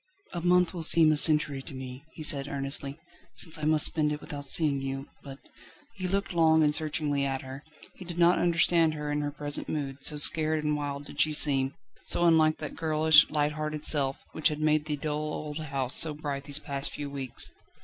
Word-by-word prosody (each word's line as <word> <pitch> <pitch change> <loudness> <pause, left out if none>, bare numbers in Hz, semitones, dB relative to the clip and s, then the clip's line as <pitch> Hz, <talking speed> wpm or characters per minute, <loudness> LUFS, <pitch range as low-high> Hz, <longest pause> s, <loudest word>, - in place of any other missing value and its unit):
"A 175 - -4
month 180 +1 +2
will 175 - -6
seem 160 -1 +5
a - - +2
century 150 -2 +3
to 135 - -9
me," 130 +1 -9
he 155 - -8
said 140 -3 +3
earnestly, 140 0 -4 0.4
"since 165 -2 -3
I 150 - -4
must 155 0 +4
spend 150 -2 +3
it 150 - -4
without 145 -1 -8
seeing 140 -1 +2
you, 135 0 -5 0.2
but 135 -1 -10 0.3
..." 295 -1 -28
He 185 - -3
looked 195 +1 -3
long 160 -2 +3
and 150 -1 +2
searchingly 150 -2 -1
at 135 -1 -3
her. 135 +2 -10 0.3
He - - -12
did 175 -1 -8
not 175 +1 +3
understand 170 -2 +2
her 150 -1 -5
in 145 0 -2
her 145 - -3
present 145 0 -3
mood, 140 -2 -5
so 150 - 0
scared 155 +1 +3
and 150 0 -1
wild 145 -1 -5
did 145 0 -3
she 155 +1 +2
seem, 135 -2 +3 0.3
so 175 - 0
unlike 160 -2 +3
that 155 - -8
girlish, 155 -1 +4
light 150 -1 -1
hearted 155 0 -5
self, 140 -3 +1
which 155 - 0
had 150 -1 -3
made 155 0 +1
the 150 -1 -3
dull 150 +1 -4
old 150 0 -6
house 135 -4 +2
so 155 -2 +3
bright 145 -2 -6
these 145 0 +1
past 140 -2 -4
few 145 - -7
weeks. 135 -3 -7
150 Hz, 215 wpm, -27 LUFS, 140-155 Hz, 0.4 s, seem